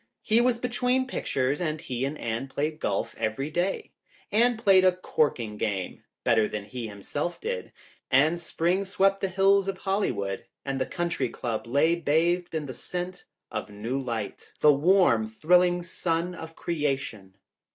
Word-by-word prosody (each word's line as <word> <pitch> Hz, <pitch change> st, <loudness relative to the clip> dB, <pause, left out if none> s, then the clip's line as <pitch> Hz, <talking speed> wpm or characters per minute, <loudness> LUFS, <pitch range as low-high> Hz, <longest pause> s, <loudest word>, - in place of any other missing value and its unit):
He 225 Hz, +2 st, +4 dB
was 245 Hz, -1 st, +3 dB
between 250 Hz, +1 st, +1 dB
pictures 140 Hz, -, -1 dB
and 155 Hz, -2 st, -1 dB
he 130 Hz, -4 st, -3 dB
and 145 Hz, +3 st, -3 dB
Anne 115 Hz, +2 st, -3 dB
played 150 Hz, +3 st, -2 dB
golf 100 Hz, -, -1 dB
every 115 Hz, +7 st, -2 dB
day. 180 Hz, +4 st, -1 dB, 0.4 s
Anne 235 Hz, +3 st, +4 dB
played 195 Hz, -4 st, +5 dB
a 185 Hz, -, +6 dB
corking 125 Hz, -11 st, 0 dB
game, 100 Hz, -4 st, -3 dB, 0.2 s
better 110 Hz, -2 st, +3 dB
than 105 Hz, -1 st, -5 dB
he 120 Hz, +1 st, -5 dB
himself 110 Hz, -, -4 dB
did. 475 Hz, +3 st, -4 dB, 0.4 s
And 155 Hz, +6 st, +4 dB
spring 175 Hz, +3 st, 0 dB
swept 195 Hz, 0 st, +2 dB
the 195 Hz, -, +1 dB
hills 195 Hz, +1 st, +4 dB
of 195 Hz, -1 st, -2 dB
Hollywood 125 Hz, -, -1 dB, 0.2 s
and 135 Hz, -1 st, -2 dB
the -, -, 0 dB
Country 175 Hz, -1 st, -1 dB
Club 115 Hz, -2 st, -4 dB
lay 140 Hz, +7 st, +3 dB
bathed 170 Hz, +2 st, +1 dB
in 155 Hz, -2 st, -1 dB
the 130 Hz, -, -6 dB
scent 180 Hz, +4 st, -6 dB, 0.3 s
of -, -, -4 dB
new 115 Hz, +6 st, -3 dB
life, 115 Hz, -5 st, -5 dB
the 150 Hz, -1 st, +7 dB
warm, 145 Hz, -, +4 dB
thrilling 175 Hz, +9 st, +3 dB
sun 170 Hz, 0 st, -2 dB
of 160 Hz, -2 st, -9 dB
creation. 135 Hz, -, -3 dB
160 Hz, 160 wpm, -27 LUFS, 125-185 Hz, 0.4 s, the